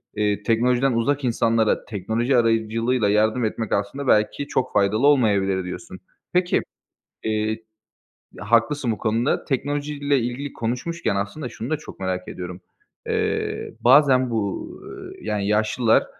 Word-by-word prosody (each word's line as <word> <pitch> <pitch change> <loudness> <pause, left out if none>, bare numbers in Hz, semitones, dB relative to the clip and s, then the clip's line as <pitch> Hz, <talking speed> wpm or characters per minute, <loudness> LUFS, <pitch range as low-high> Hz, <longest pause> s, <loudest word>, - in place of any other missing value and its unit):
eee, 105 -1 0
"Teknolojiden 125 +4 +2
uzak 140 +5 0
insanlara 115 -2 +1
teknoloji 115 +5 0
aracılığıyla 115 0 +1
yardım 110 +3 +2
etmek 110 0 -3
aslında 115 +8 -2
belki 105 +6 +2
çok 130 - -1
faydalı 105 +6 +3
olmayabilir." 100 -9 +3
Diyorsun. 175 - -8 0.3
Peki, 180 0 +2 0.6
eee, 110 0 -1 0.8
haklısın 115 +5 +1
bu 110 - -5
konuda. 115 +4 0
Teknolojiyle 145 +1 -1
ilgili 125 +4 -4
konuşmuşken 125 +2 -2
aslında 105 +8 -3
şunu 115 +1 -7
da 155 - +2
çok 150 - -12
merak 95 -1 -3
ediyorum. 90 0 -7 0.5
Eee, - - -2
bazen 130 -1 +5
bu, 105 -4 -2 0.5
yani, 105 -2 -2
yaşlılar 110 +2 +2
115 Hz, 120 wpm, -23 LUFS, 105-135 Hz, 0.8 s, bazen